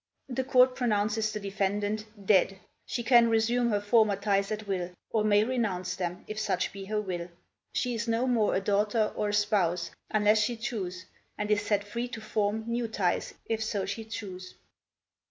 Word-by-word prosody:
The 260 +1 -1
Court 255 -1 +5
pronounces 215 -2 +1
the 210 - -4
defendant 205 +2 -1 0.2
dead! 195 -1 +4 0.3
She 240 - -2
can 235 -1 +6
resume 235 +2 +2
her 205 -2 +2
former 210 0 +3
ties 200 0 0
at 215 0 -3
will, 180 -3 -1 0.2
Or 220 -2 +2
may 210 0 +4
renounce 220 -7 -1
them, 180 -1 -4
if 215 0 -4
such 200 -4 -1
be 195 -1 -7
her 210 +2 -1
will. 180 -4 -4 0.5
She 250 -1 0
is 230 0 -3
no 230 +2 +1
more 235 -5 +2
a 190 - +1
daughter, 210 +2 +1
or 210 - -1
a - - -2
spouse, 185 -5 +1 0.2
Unless 215 0 +4
she 230 +3 0
choose, 190 -6 -4 0.3
and 210 0 -2
is 210 -1 +3
set 205 -1 0
free 235 +4 -4
to 240 -2 -7
form 215 0 -1
New 235 0 -1
ties, 195 -5 -1
if 220 -1 -1
so 205 -3 -1
she 225 +3 -4
choose." 190 -4 -7
210 Hz, 185 wpm, -29 LUFS, 200-225 Hz, 0.5 s, can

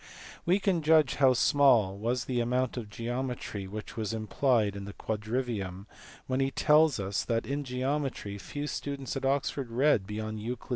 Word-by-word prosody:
We 180 +3 +5
can 190 -4 +1
judge 155 -1 +4
how 135 -2 +5
small 125 -7 +4
was 120 +4 -1
the 125 -2 -1
amount 125 +1 0
of 115 -4 -5
geometry 120 -3 -4
which 105 +3 -7
was 110 -1 -2
implied 110 -1 +1
in 100 -1 -6
the 100 - -8
quadrivium 110 -4 -3 0.4
when 130 0 -1
he 135 0 +2
tells 150 0 +4
us 95 0 -1
that 115 -1 0
in 145 +1 -2
geometry 130 -5 -2
few 145 +9 -5
students 140 -2 -4
at 135 0 -3
Oxford 135 -1 0
read 120 -4 +2
beyond 110 +1 -4
Euc. 120 +4 -3
i. - - -18
125 Hz, 175 wpm, -29 LUFS, 110-135 Hz, 0.4 s, We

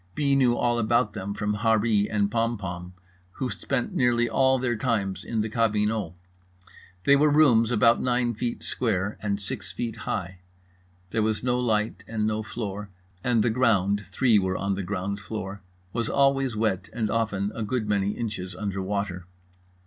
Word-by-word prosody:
B. 140 -2 +2
knew 125 -3 +3
all 120 -1 +1
about 120 0 +2
them 100 -1 -4
from 105 0 -1
Harree 110 -1 +2
and 100 -1 +1
Pompom, 95 -6 -2 0.4
who 130 -2 -3
spent 135 -3 -2
nearly 120 -2 +2
all 130 +1 +3
their 125 -2 0
time 110 -5 0
in 115 -2 -1
the 110 - -1
cabinot. 105 -4 0 0.9
They 140 - +6
were 150 +2 +4
rooms 135 -7 +5
about 115 0 +4
nine 120 -1 +1
feet 120 +2 -3
square 105 -4 -1
and 100 -1 -1
six 105 -2 -6
feet 115 +4 -4
high. 95 0 -4 0.7
There 110 - +1
was 110 +1 0
no 125 0 +1
light 110 -5 0
and 110 -2 -1
no 110 0 0
floor, 105 -1 -5 0.3
and 120 -3 +2
the 120 - +2
ground 105 -5 +2
(three 110 +3 +3
were 95 -1 -1
on 100 0 -1
the 100 - -2
ground 100 +1 -3
floor) 100 -2 -6 0.3
was 115 -2 -1
always 135 -3 +2
wet 105 -3 -1
and 110 -3 -2
often 105 -3 0
a 115 - -5
good 110 +1 -1
many 100 -1 +1
inches 105 -6 -4
under 100 -2 -3
water. 95 -2 -3
110 Hz, 170 wpm, -26 LUFS, 100-120 Hz, 0.9 s, They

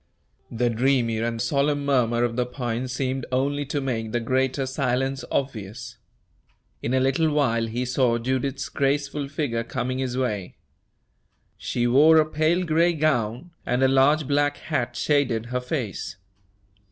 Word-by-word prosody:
The 120 +1 0
dreamy 120 -1 +1
and 115 0 -2
solemn 140 +3 0
murmur 120 -4 +2
of 120 -1 0
the 125 0 0
pines 125 0 -3
seemed 130 0 -2
only 140 +2 0
to 145 0 -1
make 115 -5 -3
the 120 - 0
greater 130 +3 0
silence 135 0 -1
obvious. 120 -2 -4 0.8
In 120 +3 -1
a - - +3
little 135 +5 +2
while 115 -6 +1
he 120 +3 -2
saw 125 -1 +2
Judith's 130 +3 -2
graceful 140 +1 -1
figure 140 -5 -2
coming 130 +2 -3
his 130 -1 -2
way. 105 -8 -2 1.0
She 120 - -2
wore 145 +6 +6
a 155 - +5
pale 155 +4 +1
gray 170 +2 +3
gown, 145 -1 0
and 125 +2 0
a - - +6
large 135 +3 +3
black 145 0 +1
hat 130 -6 -2
shaded 130 -7 +1
her 125 - 0
face. 125 - -4
130 Hz, 150 wpm, -24 LUFS, 120-140 Hz, 1.0 s, wore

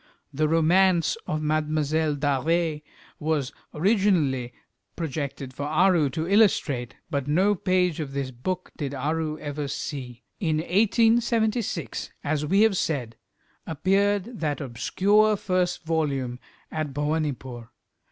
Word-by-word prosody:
The 155 +3 +1
romance 170 +2 +3
of 155 0 -2
"Mlle. 155 0 0
D'Arvers" 150 +3 0 0.4
was 150 -3 -1 0.2
originally 160 - +2 0.4
projected 140 -4 -4
for 145 +2 -4
Aru 160 -1 +3
to 160 +5 -3
illustrate, 175 - +2 0.2
but 140 -3 -1
no 185 +8 +3
page 180 -3 +1
of 145 -3 -4
this 140 -2 -3
book 180 +10 -4
did 140 -2 -3
Aru 155 +3 -1
ever 145 -1 -4
see. 130 -3 -6 0.2
In 160 -4 0
1876, 225 +2 +1
as 150 0 0
we 195 +6 +3
have 220 -3 +4
said, 125 -10 -2 0.5
appeared 200 - +1
that 150 -4 -1
obscure 200 - +2
first 185 -2 -1
volume 140 -7 -1 0.3
at 155 -3 -3
Bhowanipore. 145 -6 -2
155 Hz, 115 wpm, -25 LUFS, 140-185 Hz, 0.5 s, have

